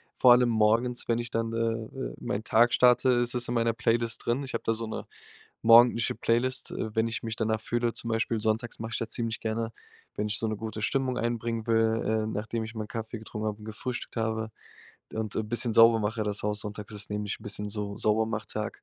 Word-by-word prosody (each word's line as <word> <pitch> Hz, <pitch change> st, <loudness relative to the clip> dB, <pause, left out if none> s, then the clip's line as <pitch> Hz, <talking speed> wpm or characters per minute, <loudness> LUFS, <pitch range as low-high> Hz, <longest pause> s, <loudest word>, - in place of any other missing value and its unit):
Vor 125 Hz, -1 st, +7 dB
allem 125 Hz, 0 st, +4 dB
morgens, 115 Hz, +2 st, +2 dB
wenn 115 Hz, -, +2 dB
ich 120 Hz, 0 st, -3 dB
dann, 115 Hz, 0 st, -1 dB
äh, 115 Hz, -, -2 dB
äh, 115 Hz, -, -2 dB
meinen 105 Hz, -, -3 dB
Tag 115 Hz, +2 st, +4 dB
starte, 125 Hz, +1 st, +5 dB
ist 120 Hz, 0 st, +1 dB
es 120 Hz, -1 st, -1 dB
in 120 Hz, -, -2 dB
meiner 115 Hz, 0 st, +2 dB
Playlist 115 Hz, 0 st, 0 dB
drin. 120 Hz, +4 st, 0 dB
Ich 130 Hz, -, -6 dB
habe -, -, -2 dB
da 115 Hz, -, +1 dB
so 115 Hz, +1 st, -4 dB
'ne 110 Hz, -, -5 dB, 0.6 s
morgendliche 115 Hz, 0 st, +6 dB
Playlist, 120 Hz, +3 st, 0 dB
äh, 110 Hz, -1 st, -4 dB
wenn 110 Hz, -, +3 dB
ich 115 Hz, -1 st, -3 dB
mich 115 Hz, -1 st, -4 dB
danach 110 Hz, -1 st, 0 dB
fühle, 120 Hz, +1 st, -1 dB
zum 115 Hz, -, -5 dB
Beispiel 115 Hz, 0 st, 0 dB
sonntags 110 Hz, +2 st, -1 dB
mache 110 Hz, 0 st, -4 dB
ich -, -, -1 dB
da 115 Hz, -, -2 dB
ziemlich 115 Hz, 0 st, -3 dB
gerne, 115 Hz, +1 st, -2 dB, 0.4 s
wenn 105 Hz, -, -1 dB
ich 105 Hz, +1 st, 0 dB
so 110 Hz, -, 0 dB
'ne 110 Hz, -, -2 dB
gute 110 Hz, 0 st, -5 dB
Stimmung 130 Hz, +1 st, 0 dB
einbringen 115 Hz, -1 st, -2 dB
will, 115 Hz, 0 st, +2 dB
ähm, 110 Hz, 0 st, 0 dB
nachdem 110 Hz, +2 st, -3 dB
ich 110 Hz, +1 st, -8 dB
meinen 110 Hz, -1 st, -5 dB
Kaffee 115 Hz, 0 st, -5 dB
getrunken 110 Hz, 0 st, -5 dB
habe 105 Hz, -1 st, -2 dB
und 105 Hz, -, -12 dB
gefrühstückt 120 Hz, +3 st, -5 dB
habe 110 Hz, 0 st, -1 dB, 0.6 s
und 110 Hz, -2 st, -3 dB
'n 110 Hz, -1 st, -2 dB
bisschen 120 Hz, +1 st, +1 dB
sauber 115 Hz, 0 st, +7 dB
mache 110 Hz, +1 st, -1 dB
das 105 Hz, -1 st, -2 dB
Haus 105 Hz, 0 st, -1 dB
sonntags, 105 Hz, 0 st, -7 dB
das 105 Hz, 0 st, -4 dB
ist -, -, -5 dB
nämlich 105 Hz, 0 st, -3 dB
'n -, -, -15 dB
bisschen 105 Hz, 0 st, -3 dB
so 100 Hz, -1 st, -4 dB
Saubermach-Tag, 110 Hz, 0 st, -1 dB
115 Hz, 225 wpm, -28 LUFS, 110-115 Hz, 0.6 s, Vor